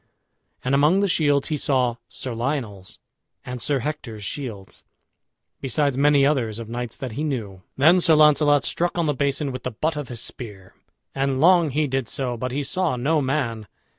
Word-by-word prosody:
And 130 - 0
among 150 +8 +4
the 200 - +2
shields 145 -5 +2
he 155 - 0
saw 125 -4 +1
Sir 130 - -6
Lionel's 115 -6 -4 0.5
and 125 -1 -6
Sir 140 +1 0
Hector's 120 -7 -5
shields, 110 -7 -7 0.8
besides 140 +1 0
many 140 0 +4
others 125 -7 0
of 115 -1 -7
knights 120 0 -5
that 130 -3 -5
he 140 +8 -4
knew. 110 -11 -4 0.2
Then 165 +7 +5
Sir 165 -2 +5
Launcelot 150 -1 +5
struck 175 +1 -1
on 170 - +1
the 150 - +1
basin 140 +1 -1
with 130 0 -6
the 125 - -3
butt 155 +7 -2
of 145 -3 -4
his 120 -2 -6
spear; 105 -7 -8 0.4
and 135 -1 0
long 170 0 +5
he 150 +3 0
did 130 -4 -2
so, 125 -3 -2
but 125 +2 -4
he 140 +3 -2
saw 170 +1 -1
no 150 +5 +1
man. 130 -6 -2
135 Hz, 185 wpm, -23 LUFS, 120-150 Hz, 0.8 s, Then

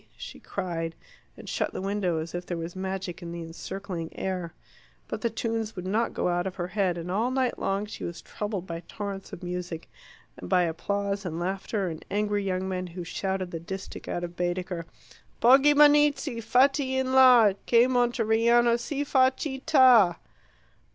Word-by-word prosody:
she - - -9
cried, 165 -2 -4 0.4
and - - -11
shut - - -2
the - - -4
window 195 -3 -1
as 160 +1 -5
if 175 0 -3
there 175 - -4
was 165 +2 -6
magic 190 -1 -4
in 170 -1 -7
the 170 0 -5
encircling 175 +1 -6
air. 185 -3 -3 0.6
But - - -5
the 235 - +1
tunes 225 -1 -3
would 180 -1 -6
not 215 +5 0
go - - 0
out 175 +1 0
of 185 - -5
her 175 -1 -4
head, 190 -4 0
and 170 +1 -5
all 220 +6 +1
night 255 -1 0
long 195 +2 -1
she 210 - -8
was 170 - -5
troubled 205 -3 -5
by 165 -2 -5
torrents 200 -2 -6
of 175 - -9
music, 180 -2 -5 0.5
and 90 - -9
by 180 - +4
applause 200 +4 -2
and 170 -3 -4
laughter, 190 +2 -2
and 160 -2 -6
angry 205 0 0
young 190 -1 -2
men 185 -1 -3
who 175 +1 -7
shouted 190 +1 -3
the 165 - -4
distich 190 +4 -7
out 175 - -3
of 175 0 -6
Baedeker: 175 -1 -3 0.5
Poggibonizzi 290 0 +5
fatti 265 +3 +3
in 260 0 0
la, 250 -6 +7
Che 235 0 +6
Monteriano 235 -1 +3
si 285 +4 -3
fa 260 -2 +4
citta! 260 - +4
195 Hz, 175 wpm, -27 LUFS, 175-235 Hz, 0.6 s, la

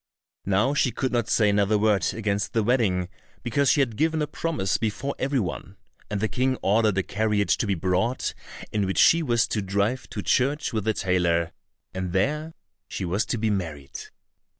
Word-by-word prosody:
Now 105 +8 +2
she 140 - +2
could 130 +3 -2
not 120 -3 0
say 105 - +3
another 100 +1 +2
word 105 -4 +2
against 105 -2 -2
the 115 - +2
wedding 100 -7 +1 0.4
because 135 +3 +1
she 145 - +4
had 120 -5 -1
given 160 +5 +1
a - - +1
promise 150 - -2
before 115 +5 -2
every 135 0 0
one, 95 0 -5 0.3
and 105 - -2
the 110 - +1
King 130 +2 0
ordered 105 0 +2
a 95 - +2
carriage 105 0 +1
to 110 - -1
be 100 - +1
brought 95 +9 0 0.4
in 105 -2 0
which 95 - -2
she 165 - +6
was 120 -6 +2
to 105 - -1
drive 100 +6 -1
to - - -5
church 140 +1 +1
with 110 -2 -2
the 110 -1 +1
tailor, 85 -3 +1 0.4
and 95 -1 -4
there 150 +11 -1 0.3
she - - -4
was 95 +5 -1
to - - -1
be 110 -1 0
married. 80 -8 -4
110 Hz, 190 wpm, -25 LUFS, 95-125 Hz, 0.4 s, she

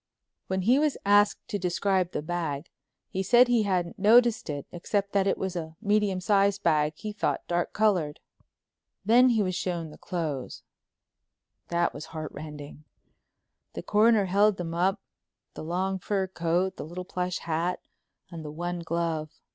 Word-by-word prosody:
'" - - -58
When 190 0 -1
he 245 +7 +4
was 300 -2 +1
asked 205 +1 +3
to 205 - -2
describe 185 0 0
the - - -3
bag, 160 -3 -3 0.4
he 190 - -3
said 240 +6 +5
he 240 -2 +3
hadn't 185 0 -1
noticed 230 0 +4
it 145 -2 -4
except 200 +3 -2
that 200 -1 +2
it 195 - +1
was 190 -1 -3
a 160 -2 -5
medium 205 -2 +1
sized 200 +1 +2
bag, 155 -2 +2
he 210 +6 -6
thought, 210 - -2
dark 175 0 -1
colored. 185 -9 +1 0.9
Then 245 +4 +6
he 225 -3 +2
was 185 -1 -1
shown 170 -3 -3
the - - -14
clothes—that 170 +1 -6
was 145 - -7
heart 155 -1 -6
rending. 150 0 -9 0.9
The - - -6
Coroner 215 -1 +4
held 200 +2 +3
them 165 -2 -4
up, 190 +4 +1 0.5
the - - -8
long 190 +4 -1
fur 195 +1 -1
coat, 180 +1 -1
the - - -5
little 175 +4 -7
plush 180 -1 -2
hat, 170 +2 -2 0.5
and 165 -2 -7
the 150 - -6
one 175 +3 -4
glove. 165 -2 -2
180 Hz, 165 wpm, -27 LUFS, 165-205 Hz, 0.9 s, Then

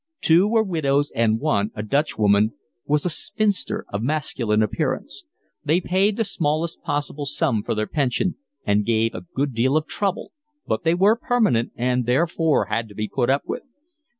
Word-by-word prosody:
Two 170 +5 +4
were 220 0 +3
widows, 145 -7 0
and 115 -1 +2
one, 105 -8 +1
a 105 - -4
Dutchwoman, 110 -5 +2 0.3
was 150 +2 +1
a - - +2
spinster 205 +4 -1
of 100 - -1
masculine 120 -6 0
appearance; 105 - -2 0.4
they 155 +4 +2
paid 195 +3 +1
the 225 - +2
smallest 165 -4 -2
possible 145 0 -3
sum 135 -7 0
for - - -2
their 110 0 0
pension, 145 - 0 0.3
and 105 0 +2
gave 115 0 +1
a 90 - -7
good 140 0 0
deal 130 +6 +2
of 155 - -1
trouble, 195 +3 -2 0.3
but - - -1
they 165 +1 +3
were 200 +5 +4
permanent 225 - +1
and 125 0 0
therefore 160 +4 +2
had 115 0 -2
to 105 - -14
be 105 +1 -2
put 125 +1 -1
up 140 +1 +2
with. 265 - -6
145 Hz, 175 wpm, -23 LUFS, 115-170 Hz, 0.4 s, Two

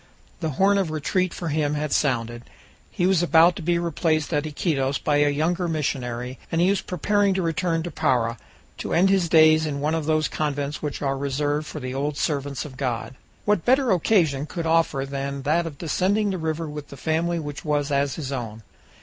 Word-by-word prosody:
The 160 - -2
horn 200 +1 +4
of 190 -4 0
retreat 170 +4 0
for 170 - -4
him 150 -1 0
had 150 0 -2
sounded; 120 -4 0 0.5
he 175 - -1
was 185 -2 +3
about 170 0 +5
to - - -5
be 170 +1 +1
replaced 165 -2 0
at 145 +1 0
Iquitos 140 -3 -1
by 145 -1 +1
a 145 0 +4
younger 170 +5 0
missionary, 125 -5 -3
and 165 - 0
he 180 +3 +4
was 200 - 0
preparing 200 +2 +1
to 190 - 0
return 165 0 0
to 175 - -5
Para, 125 -8 0 0.4
to - - -3
end 190 +3 +4
his 185 -4 +2
days 155 -1 +5
in 140 -2 -3
one 150 +2 0
of 160 -2 -2
those 155 -1 +2
convents 145 -1 -3
which 150 -1 -4
are 135 -1 0
reserved 145 +2 -1
for 155 - -6
the 130 -2 -5
old 140 +2 -2
servants 140 -3 -2
of 130 -3 -10
God. 125 -3 -3 0.3
What 205 -4 +2
better 260 0 +3
occasion 160 -6 +2
could 170 0 -4
offer 160 -4 +2
than 140 0 -4
that 165 +4 +1
of 145 -3 -8
descending 195 +6 +1
the 185 - -3
river 160 0 -2
with 150 -1 -7
the 140 - -11
family 165 +4 0
which 145 -3 -6
was 145 -2 0
as 140 0 +1
his 140 -4 -5
own? 115 -4 -5
155 Hz, 205 wpm, -24 LUFS, 140-170 Hz, 0.5 s, about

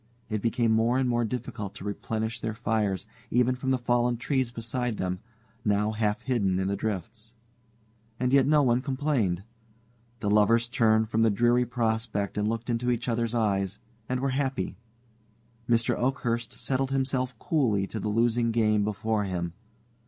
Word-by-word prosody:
It 110 -1 -1
became 115 0 +1
more 115 +3 +3
and 130 -1 +2
more 120 -1 +1
difficult 110 -4 -4
to 105 - -8
replenish 110 +2 -3
their 110 -1 -3
fires, 110 -4 0 0.2
even 125 +1 +3
from 130 +1 -3
the 130 - +3
fallen 120 0 +1
trees 130 0 0
beside 120 0 -3
them, 90 0 -2 0.4
now 105 +1 +2
half 105 -1 -1
hidden 100 -8 +1
in 95 0 0
the 100 - 0
drifts. 110 +3 -5 0.8
And 125 +1 +1
yet 135 -1 +5
no 150 0 +5
one 125 -1 +3
complained. 130 - 0 0.8
The 105 - -1
lovers 115 +3 +4
turned 110 -2 +3
from 110 0 +1
the 115 - +5
dreary 120 +4 +3
prospect 110 -3 -1
and 105 0 0
looked 115 +1 -2
into 120 0 0
each 120 0 -1
other's 115 0 0
eyes, 100 -3 0 0.3
and 130 0 -1
were 135 0 0
happy. 130 -9 -1 0.9
Mr. 115 0 +3
Oakhurst 120 -2 -1
settled 135 0 -1
himself 130 -2 -1
coolly 110 -9 +1
to 110 - -5
the 105 - -2
losing 115 +2 +2
game 110 -2 +2
before 105 0 -1
him. 85 -3 -3
115 Hz, 165 wpm, -27 LUFS, 105-125 Hz, 0.9 s, yet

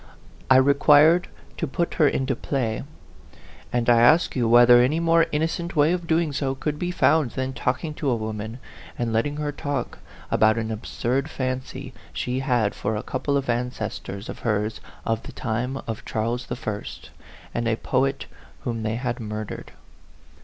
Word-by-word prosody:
I 130 - +7
required 145 +5 +6 0.3
to 165 - -2
put 170 +5 -1
her 155 - +4
into 135 -1 0
play. 115 -4 -2 0.9
And 120 -1 0
I 120 -1 +6
ask 155 +8 +5
you 120 -3 +1
whether 120 +1 +8
any 140 +6 +2
more 165 0 +4
innocent 165 +3 -1
way 150 +1 +4
of 175 -1 -2
doing 160 -2 +1
so 135 -1 -1
could 150 +2 -3
be 175 - -1
found 160 -5 +3
than 130 0 -2
talking 140 +5 -2
to 150 -2 -2
a 125 - +2
woman, 110 0 -5 0.4
and 120 -2 -1
letting 145 +6 0
her 150 -1 -2
talk, 145 -1 -4 0.3
about 110 +1 +4
an 110 -1 -2
absurd 125 +5 -2
fancy 130 0 -4 0.2
she 125 +1 -2
had 125 -6 +1
for 110 +2 -2
a 105 - -3
couple 140 +2 -1
of 140 - -2
ancestors 120 -4 -3
of - - -7
hers 105 -1 -1 0.2
of 115 0 0
the - - -9
time 125 +3 -2
of 115 -2 -5
Charles 115 +3 -2
I. 105 -4 -3 0.7
and 120 0 -1
a 115 - +2
poet 135 +3 0 0.4
whom 115 -3 -3
they 110 0 -1
had 120 0 -3
murdered? 110 -1 -6
130 Hz, 165 wpm, -24 LUFS, 115-145 Hz, 0.9 s, whether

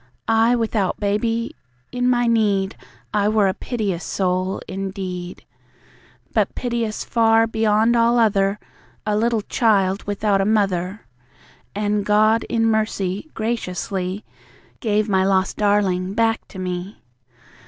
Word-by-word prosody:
I 225 +2 +4
without 220 -5 -1
Baby? 225 +3 -1 0.4
In 250 0 0
my 245 -1 +2
need 205 -4 +1 0.4
I 210 0 +2
were 215 -2 +3
a 190 - +1
piteous 200 -9 -3
soul 185 +1 -1
indeed. 190 -2 -5 0.9
But - - +1
piteous 235 -3 -2
far, 225 -1 +3
beyond 220 +1 +2
all 235 +1 +3
other, 200 -3 +2 0.5
A 210 -1 0
little 225 0 +1
child 200 -4 +2
without 205 -1 +1
a - - +2
mother. 195 -2 0 0.7
And 205 0 0
God, 215 +2 +3
in 225 -1 +1
mercy, 215 +1 -1
graciously 195 -3 -3 0.5
Gave 215 -2 +1
my 190 -2 +2
lost 190 0 +1
darling 200 -2 +1
back 225 0 +1
to - - -12
me. 185 +1 -5
210 Hz, 120 wpm, -21 LUFS, 195-225 Hz, 0.9 s, I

